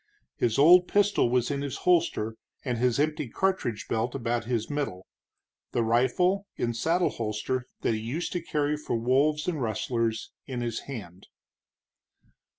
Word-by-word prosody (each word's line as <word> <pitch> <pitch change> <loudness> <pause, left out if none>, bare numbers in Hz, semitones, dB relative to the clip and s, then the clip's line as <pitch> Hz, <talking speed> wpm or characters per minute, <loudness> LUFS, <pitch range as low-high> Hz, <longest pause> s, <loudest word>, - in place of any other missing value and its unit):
His 115 0 0
old 175 +5 +7
pistol 205 -10 +3
was 125 +2 +1
in 140 0 -2
his 140 -2 -4
holster, 165 -11 +2 0.3
and 120 -3 -1
his 125 +1 +2
empty 150 -3 0
cartridge 185 - -1
belt 115 +3 -1
about 120 -2 -1
his 115 -2 -1
middle, 140 -11 -3 0.7
the 120 - +2
rifle, 130 - +2
in 120 - -1
saddle 165 +9 +1
holster, 115 +3 -3
that - - +1
he 110 - -1
used 135 +10 -3
to 175 - -1
carry 150 -2 0
for 150 - -3
wolves 140 +6 +2
and 160 -6 -1
rustlers, 115 0 -1 0.2
in 125 -3 -4
his 120 -2 -2
hand. 100 -8 -8
125 Hz, 155 wpm, -27 LUFS, 115-150 Hz, 0.7 s, old